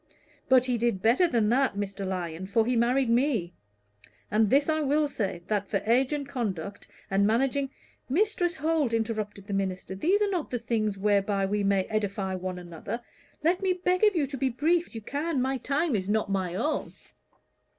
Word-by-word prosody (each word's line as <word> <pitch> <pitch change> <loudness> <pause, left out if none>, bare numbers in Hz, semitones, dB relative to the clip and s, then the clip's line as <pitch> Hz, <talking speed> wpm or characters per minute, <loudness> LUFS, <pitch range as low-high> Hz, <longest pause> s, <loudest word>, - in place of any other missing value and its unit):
But 255 -1 +6
he 250 -2 0
did 225 -5 0
better 250 +11 +4
than 230 -8 +1
that, 255 -2 +2
Mr. 200 -1 -4
Lyon, 180 -1 -4
for 220 +3 +2
he 250 +1 +1
married 245 +3 +2
me; 230 - +1 0.8
and 215 0 +3
this 280 +4 +4
I 315 -1 +1
will 295 +1 +2
say, 195 -10 -3
that 205 -1 -1
for 205 - +1
age, 250 +5 +3
and 290 -2 -2
conduct, 200 - -4 0.2
and 200 +1 +3
managing 270 +4 +1 0.2
" - - -37
"Mistress 370 -5 +1
Holt," 305 -4 0
interrupted 215 -3 -2
the 200 - -5
minister, 190 -1 -2
"these 345 - +2
are 415 -1 +1
not 350 -5 -2
the 250 - -1
things 220 -3 -1
whereby 200 0 +1
we 205 +1 0
may 195 -1 +2
edify 200 -2 -2
one 185 0 -4
another. 175 +5 -6 0.4
Let 350 +4 +2
me 380 -1 +2
beg 365 +1 0
of 420 -2 +5
you 310 -4 +2
to 275 0 -6
be 270 - +1
as 255 - -3
brief 335 +6 +2
as - - -17
you 225 - -5
can. 290 +6 -2
My 265 +1 0
time 285 +1 0
is 190 -1 -2
not 210 -1 0
my 185 -3 -1
own." 295 +10 -1
230 Hz, 200 wpm, -27 LUFS, 200-280 Hz, 0.8 s, But